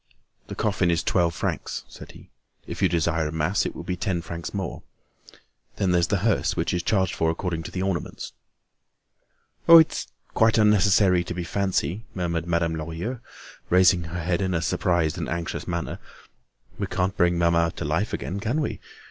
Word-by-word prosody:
"The - - -7
coffin 100 -4 +1
is 85 0 +1
twelve 85 -2 +1
francs," - - -3
said - - -12
he. - - -16 0.3
"If - - -7
you - - +4
desire 80 -1 0
a - - -4
mass, 80 +5 0
it - - -7
will 80 - -7
be 90 +1 -3
ten 90 -2 -2
francs 85 0 -6
more. 95 -3 -4 0.9
Then 95 -2 0
there's 85 -1 +3
the 100 - +1
hearse, 115 - +1
which - - -1
is 90 - 0
charged 95 0 +1
for 80 - +1
according 85 0 -2
to - - -8
the 95 - -3
ornaments." 95 -4 -3 1.4
"Oh! 165 - +12
it's 160 -1 +3 0.3
quite 110 0 +3
unnecessary 100 -3 +4
to 90 - -5
be 90 - -3
fancy," 95 +1 -1
murmured 85 -2 -2
Madame 85 -1 +1
Lorilleux, 85 +10 -4 0.5
raising 90 -1 +4
her 85 +1 -5
head 85 +2 0
in 95 -2 0
a 80 - 0
surprised 85 -2 0
and - - -3
anxious 85 0 -4
manner. 85 -2 -3 0.8
"We - - -1
can't 95 +2 -1
bring 90 -1 +2
mamma 85 -1 +2
to - - -4
life - - 0
again, 95 - -4
can 115 +8 -1
we? 150 - -2
90 Hz, 180 wpm, -25 LUFS, 85-95 Hz, 1.4 s, Oh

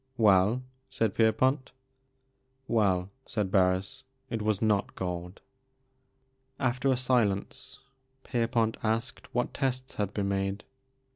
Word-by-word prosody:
"Well? 105 +3 +4 0.3
"said 115 -6 0
Pierpont. 130 +5 +2 0.5
" 130 0 -45 0.2
Well," 95 -4 +2 0.2
said 105 -4 -2
Harris, 95 +8 +2
" 130 0 -44
it 115 -2 -2
was 105 -2 +1
not 105 -3 +1
gold." 90 0 -5 1.2
After 130 +1 0
a 130 - +3
silence 125 0 0 0.5
Pierpont 115 -2 0
asked 115 +3 -2
what 125 0 -1
tests 130 -2 -2
had 100 -1 -1
been 100 -2 -1
made. 95 +1 -1
110 Hz, 120 wpm, -29 LUFS, 100-130 Hz, 1.2 s, Well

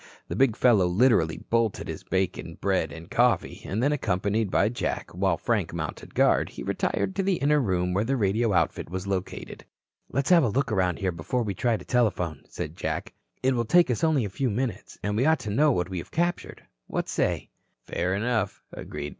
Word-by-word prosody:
The - - -3
big 130 -5 +3
fellow 110 -7 +4
literally 90 -4 +3
bolted 115 -3 +1
his - - -5
bacon, 90 -3 -2
bread 95 -5 0
and 80 +3 -9
coffee, 120 -6 +2
and 105 +6 -2
then 145 - +3
accompanied 105 -5 0
by 95 - +3
Jack, 120 +2 -3
while 95 -1 +1
Frank - - -1
mounted - - -6
guard, - - +3
he - - -8
retired 195 - -1
to 195 - +1
the 195 -1 +1
inner 150 -1 +2
room 90 -5 0
where 100 +3 +1
the 135 +4 0
radio 110 +1 +1
outfit 90 - 0
was 95 +2 -4
located. 95 -2 -4 0.5
"Let's 140 +6 0
have 170 -3 +7
a 120 - +2
look 135 +3 0
around 95 -4 +1
here 95 -3 -1
before 85 +9 -2
we 100 -3 -2
try 115 +3 +1
to - - -12
telephone," 90 - 0
said 75 +2 -5
Jack. - - -3 0.3
"It 130 +1 +3
will 120 -2 +1
take 175 +2 +4
us 120 - -2
only 155 -7 +3
a - - -3
few 130 +5 -1
minutes. 115 +2 -3
And 105 0 -1
we 120 +5 +2
ought 160 -4 +3
to 105 - -4
know 145 +8 +4
what 90 -7 0
we 90 - -2
have - - -9
captured. 175 +1 -2 0.2
What - - -2
say?" - - -1 0.3
"Fair 90 +2 -1
enough," 110 -2 -1
Bob - - -8
agreed. 75 - -5
110 Hz, 210 wpm, -26 LUFS, 95-130 Hz, 0.5 s, have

